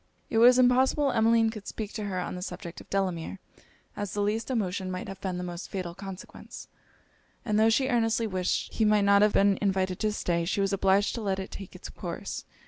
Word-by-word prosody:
It 225 Hz, -, +2 dB
was 245 Hz, +2 st, +7 dB
impossible 260 Hz, +3 st, +4 dB
Emmeline 225 Hz, -1 st, +3 dB
could 215 Hz, -3 st, -9 dB
speak 215 Hz, -2 st, -5 dB
to 215 Hz, -, -4 dB
her 190 Hz, -2 st, -2 dB
on 180 Hz, -, -4 dB
the 180 Hz, -, -6 dB
subject 180 Hz, -2 st, -7 dB
of -, -, -18 dB
Delamere, 190 Hz, -2 st, -2 dB, 0.6 s
as 205 Hz, -2 st, -4 dB
the 205 Hz, -, 0 dB
least 220 Hz, +4 st, -1 dB
emotion 195 Hz, -6 st, -1 dB
might 185 Hz, 0 st, -5 dB
have 195 Hz, -1 st, -8 dB
been 185 Hz, -2 st, -2 dB
of -, -, -4 dB
the 180 Hz, -, -4 dB
most 175 Hz, 0 st, -6 dB
fatal 185 Hz, -3 st, -4 dB
consequence; 195 Hz, 0 st, -10 dB, 0.8 s
and 215 Hz, -2 st, +1 dB
tho' 220 Hz, +1 st, +5 dB
she 260 Hz, +4 st, +2 dB
earnestly 230 Hz, -2 st, +1 dB
wished 185 Hz, -4 st, -1 dB
he 225 Hz, -, +1 dB
might 210 Hz, -1 st, +4 dB
not 200 Hz, 0 st, +5 dB
have 210 Hz, 0 st, +4 dB
been 200 Hz, -1 st, +3 dB
invited 190 Hz, -2 st, 0 dB
to 215 Hz, -1 st, +1 dB
stay, 170 Hz, -4 st, -1 dB
she 180 Hz, +4 st, -1 dB
was 195 Hz, 0 st, +1 dB
obliged 195 Hz, +1 st, +2 dB
to 235 Hz, -, -4 dB
let 195 Hz, -2 st, -1 dB
it 190 Hz, 0 st, -6 dB
take 195 Hz, -2 st, -9 dB
it's -, -, -8 dB
course. -, -, -6 dB
200 Hz, 220 wpm, -28 LUFS, 185-225 Hz, 0.8 s, was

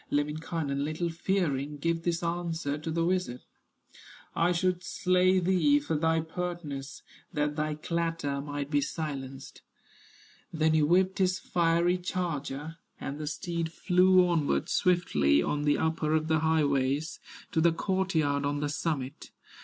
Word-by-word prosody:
Lemminkainen, 150 Hz, -1 st, -1 dB
little 155 Hz, +3 st, -2 dB
fearing, 155 Hz, -5 st, -1 dB
Gives 165 Hz, +3 st, -1 dB
this 170 Hz, 0 st, -1 dB
answer 170 Hz, -3 st, -2 dB
to 155 Hz, +2 st, -6 dB
the 165 Hz, +1 st, 0 dB
wizard: 180 Hz, -8 st, -1 dB, 0.9 s
"I 170 Hz, +2 st, +3 dB
should 180 Hz, 0 st, 0 dB
slay 185 Hz, 0 st, +2 dB
thee 170 Hz, -5 st, +3 dB
for 145 Hz, +2 st, -2 dB
thy 160 Hz, +1 st, +2 dB
pertness, 160 Hz, -4 st, -5 dB, 0.3 s
That 150 Hz, 0 st, 0 dB
thy 155 Hz, 0 st, -1 dB
clatter 165 Hz, -3 st, -2 dB
might 145 Hz, 0 st, -5 dB
be 145 Hz, -1 st, +3 dB
silenced." 135 Hz, -3 st, -5 dB, 0.9 s
Then 155 Hz, -1 st, +2 dB
he 155 Hz, -, +4 dB
whipped 185 Hz, +5 st, +3 dB
his 185 Hz, -1 st, +2 dB
fiery 170 Hz, +1 st, +1 dB
charger, 160 Hz, -4 st, -4 dB, 0.2 s
And 140 Hz, +2 st, -5 dB
the 150 Hz, -, -4 dB
steed 165 Hz, +1 st, -3 dB
flew 185 Hz, +1 st, +4 dB
onward 165 Hz, -5 st, 0 dB
swiftly, 75 Hz, -, +3 dB
On 150 Hz, 0 st, -1 dB
the 145 Hz, -, +3 dB
upper 160 Hz, -1 st, 0 dB
of 155 Hz, 0 st, 0 dB
the 160 Hz, -1 st, +3 dB
highways, 150 Hz, -1 st, +1 dB, 0.3 s
To 160 Hz, -, +1 dB
the 170 Hz, +1 st, +5 dB
court 190 Hz, +2 st, -1 dB
yard 145 Hz, -2 st, +2 dB
on 145 Hz, 0 st, -1 dB
the 145 Hz, 0 st, -1 dB
summit. 145 Hz, -3 st, -3 dB
160 Hz, 145 wpm, -29 LUFS, 145-175 Hz, 0.9 s, the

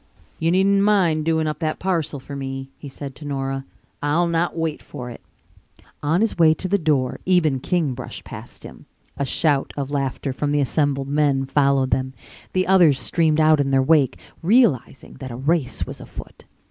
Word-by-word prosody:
"You 165 Hz, -, +1 dB
needn't 195 Hz, +3 st, +3 dB
mind 180 Hz, -7 st, +2 dB
doing 160 Hz, -1 st, +1 dB
up 150 Hz, -1 st, -3 dB
that 155 Hz, -2 st, -1 dB
parcel 165 Hz, -6 st, -1 dB
for 140 Hz, +2 st, -9 dB
me," 135 Hz, -1 st, -5 dB
he 145 Hz, -, -8 dB
said 135 Hz, 0 st, -8 dB
to -, -, -11 dB
Nora. 135 Hz, -1 st, -3 dB, 0.4 s
"I'll 150 Hz, +4 st, +2 dB
not 170 Hz, 0 st, 0 dB
wait 160 Hz, -2 st, -2 dB
for 125 Hz, -4 st, -8 dB
it." -, -, -11 dB, 0.8 s
On 160 Hz, +6 st, +1 dB
his 220 Hz, -5 st, 0 dB
way 160 Hz, -1 st, +6 dB
to 185 Hz, -, -5 dB
the 200 Hz, +2 st, +1 dB
door 140 Hz, -6 st, 0 dB
Eben 160 Hz, -7 st, +3 dB
King 160 Hz, -1 st, 0 dB
brushed 125 Hz, 0 st, -8 dB
past -, -, -10 dB
him. 65 Hz, -, -12 dB, 0.3 s
A 140 Hz, -, -1 dB
shout 140 Hz, +1 st, 0 dB
of 140 Hz, -1 st, -3 dB
laughter 135 Hz, -1 st, -2 dB
from 145 Hz, +2 st, -2 dB
the 145 Hz, -, +2 dB
assembled 140 Hz, -1 st, 0 dB
men 140 Hz, -2 st, +1 dB
followed 135 Hz, -1 st, +2 dB
them. 130 Hz, +1 st, -1 dB, 0.4 s
The 185 Hz, 0 st, +1 dB
others 175 Hz, -8 st, +5 dB
streamed 160 Hz, -2 st, +1 dB
out 155 Hz, -1 st, +5 dB
in 140 Hz, -1 st, +1 dB
their 135 Hz, -1 st, +3 dB
wake, 135 Hz, -3 st, +3 dB, 0.2 s
realizing 170 Hz, -, +1 dB
that 130 Hz, -, -6 dB
a 120 Hz, -, -6 dB
race 145 Hz, +2 st, -1 dB
was -, -, -9 dB
afoot. -, -, -11 dB
145 Hz, 185 wpm, -22 LUFS, 135-165 Hz, 0.8 s, way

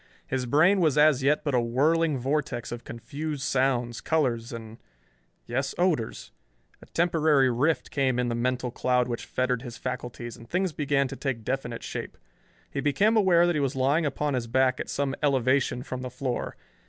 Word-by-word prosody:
His 130 Hz, -1 st, -2 dB
brain 175 Hz, +9 st, +4 dB
was 155 Hz, -4 st, +2 dB
as 150 Hz, -3 st, +5 dB
yet 145 Hz, +3 st, +2 dB
but 145 Hz, -, -1 dB
a 125 Hz, -, +3 dB
whirling 150 Hz, +6 st, +2 dB
vortex 135 Hz, -2 st, -2 dB
of 120 Hz, 0 st, -6 dB
confused 145 Hz, +4 st, -5 dB
sounds, 125 Hz, -4 st, 0 dB
colors 125 Hz, -7 st, 0 dB
and 115 Hz, -1 st, -8 dB, 0.7 s
yes, 135 Hz, +3 st, -2 dB
odors. 170 Hz, -11 st, -1 dB, 0.5 s
A -, -, -15 dB
temporary 155 Hz, -6 st, +3 dB
rift 130 Hz, +3 st, 0 dB
came 130 Hz, -3 st, +1 dB
in 125 Hz, 0 st, +1 dB
the 120 Hz, -, -1 dB
mental 125 Hz, +1 st, -1 dB
cloud 125 Hz, 0 st, +1 dB
which 120 Hz, -1 st, -4 dB
fettered 125 Hz, -2 st, 0 dB
his 120 Hz, -2 st, -8 dB
faculties, 120 Hz, -2 st, -5 dB
and 115 Hz, +1 st, -14 dB
things 180 Hz, -1 st, 0 dB
began 140 Hz, -2 st, +1 dB
to -, -, -7 dB
take 130 Hz, -5 st, -3 dB
definite 120 Hz, -1 st, -3 dB
shape. -, -, -6 dB, 0.5 s
He -, -, -3 dB
became 200 Hz, +11 st, +2 dB
aware 185 Hz, -5 st, +5 dB
that 175 Hz, -1 st, +1 dB
he 150 Hz, -, +1 dB
was 135 Hz, -2 st, -1 dB
lying 140 Hz, +5 st, +2 dB
upon 145 Hz, +1 st, -1 dB
his 125 Hz, -2 st, -2 dB
back 130 Hz, +1 st, +2 dB
at -, -, -4 dB
some 140 Hz, -1 st, -1 dB
elevation 130 Hz, -2 st, +1 dB
from 130 Hz, -2 st, -5 dB
the 130 Hz, -, -4 dB
floor. 125 Hz, 0 st, -4 dB
135 Hz, 180 wpm, -27 LUFS, 125-150 Hz, 0.7 s, as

